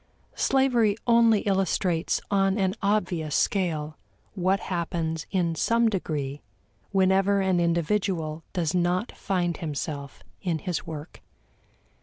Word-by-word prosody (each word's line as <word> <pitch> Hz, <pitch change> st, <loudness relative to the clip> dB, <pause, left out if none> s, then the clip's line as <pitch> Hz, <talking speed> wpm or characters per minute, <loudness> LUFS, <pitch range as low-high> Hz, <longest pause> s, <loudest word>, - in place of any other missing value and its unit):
Slavery 245 Hz, -6 st, +2 dB
only 230 Hz, -3 st, +5 dB
illustrates 190 Hz, -4 st, 0 dB
on 195 Hz, 0 st, +2 dB
an 190 Hz, -2 st, +1 dB
obvious 180 Hz, -7 st, 0 dB
scale 155 Hz, -6 st, 0 dB, 0.3 s
what 190 Hz, 0 st, +1 dB
happens 165 Hz, -3 st, -3 dB
in 175 Hz, -4 st, 0 dB
some 230 Hz, +7 st, +2 dB
degree 150 Hz, -8 st, -3 dB, 0.5 s
whenever 195 Hz, +1 st, +3 dB
an 190 Hz, -2 st, +2 dB
individual 170 Hz, -2 st, 0 dB
does 170 Hz, -3 st, -1 dB
not 180 Hz, +4 st, +1 dB
find 175 Hz, -4 st, -1 dB
himself 145 Hz, -2 st, -5 dB, 0.2 s
in 175 Hz, -4 st, -1 dB
his 175 Hz, +1 st, -4 dB
work. 155 Hz, 0 st, -8 dB
180 Hz, 110 wpm, -26 LUFS, 160-200 Hz, 0.5 s, only